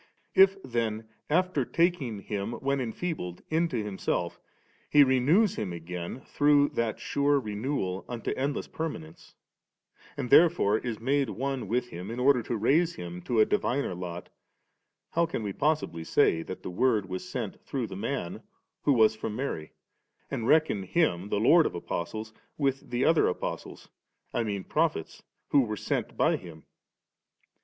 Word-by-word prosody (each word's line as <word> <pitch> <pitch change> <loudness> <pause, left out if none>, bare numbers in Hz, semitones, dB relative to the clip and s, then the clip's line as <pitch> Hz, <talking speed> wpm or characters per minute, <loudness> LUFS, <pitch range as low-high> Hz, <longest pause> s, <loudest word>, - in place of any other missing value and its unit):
If 195 0 +6
then 115 -2 -2 0.2
after 180 -2 +2
taking 145 - 0
him, 100 +2 -3
when 140 +2 -1
enfeebled^, 115 - -4
into 160 -4 +1
Himself 100 -2 -2 0.5
He 145 -1 +7
renews 140 - +3
him 100 -4 -2
again 85 +6 -6
through 145 0 +3
that 115 -2 -2
sure 145 0 +2
renewal 105 -4 -3
unto 120 -3 -3
endless 140 +2 -2
permanence, 85 - -6 0.8
and 125 - -4
therefore 155 -11 +5
is 120 -3 -4
made 135 +3 +1
one 135 -3 -3
with 120 +3 -1
him 90 +4 -7
in 115 +2 -5
order 130 -1 +4
to 115 +1 -3
raise 160 +10 +2
him 90 0 -7
to 115 +5 0
a 110 - +7
diviner 135 -5 0
lot, 90 -1 -6 0.8
how 170 0 +2
can 140 - -3
we 100 -2 -3
possibly 145 - 0
say 80 0 +3
that 95 - -7
the - - -5
Word 105 0 +2
was 95 0 -5
sent - - -5
through - - -3
the - - -8
Man - - -3 0.4
who 145 - +3
was 110 -3 +5
firom 110 -1 -4
Mary, 110 - -4 0.6
and 115 - -2
reckon 155 -10 +3
Him, 95 - 0
the 100 - 0
Lord 160 +9 +6
of - - -6
Apostles, 110 +6 -4 0.2
with 135 -2 -1
the 125 +1 0
other 165 0 +4
Apostles, - - -4 0.5
I 120 - +1
mean 100 -3 -3
prophet^ 155 - -1 0.3
who 140 - +5
were 110 -4 -2
sent - - -2
by - - +3
Him 80 -4 -12
120 Hz, 155 wpm, -28 LUFS, 100-145 Hz, 0.8 s, He